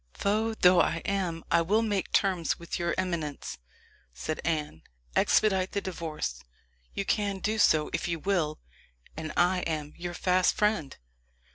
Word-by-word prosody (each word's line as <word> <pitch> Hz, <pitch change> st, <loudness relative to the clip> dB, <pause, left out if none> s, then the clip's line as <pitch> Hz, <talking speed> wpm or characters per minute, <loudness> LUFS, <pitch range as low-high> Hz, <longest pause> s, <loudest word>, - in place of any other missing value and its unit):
"Foe 220 Hz, +2 st, 0 dB
though 180 Hz, -3 st, +6 dB
I 165 Hz, -, +1 dB
am, 180 Hz, -5 st, -1 dB
I 170 Hz, -, +5 dB
will 210 Hz, +7 st, +2 dB
make 205 Hz, -4 st, -1 dB
terms 185 Hz, -4 st, +1 dB
with 170 Hz, -, -5 dB
your 170 Hz, 0 st, 0 dB
eminence," 160 Hz, -, -3 dB, 0.6 s
said 155 Hz, -, -4 dB
Anne. 150 Hz, -, -2 dB, 0.3 s
"Expedite 190 Hz, -3 st, +3 dB
the 200 Hz, -, +1 dB
divorce 160 Hz, -, -4 dB, 0.5 s
you 195 Hz, -, -2 dB
can 200 Hz, -2 st, 0 dB
do 215 Hz, +3 st, -1 dB
so 155 Hz, -6 st, +4 dB
if -, -, -1 dB
you 170 Hz, -1 st, -1 dB
will 165 Hz, -4 st, 0 dB, 0.6 s
and 155 Hz, -1 st, -5 dB
I 180 Hz, +1 st, +4 dB
am 155 Hz, -4 st, -3 dB
your 175 Hz, 0 st, -5 dB
fast 185 Hz, 0 st, +2 dB
friend." 210 Hz, -10 st, 0 dB
175 Hz, 150 wpm, -28 LUFS, 160-195 Hz, 0.6 s, though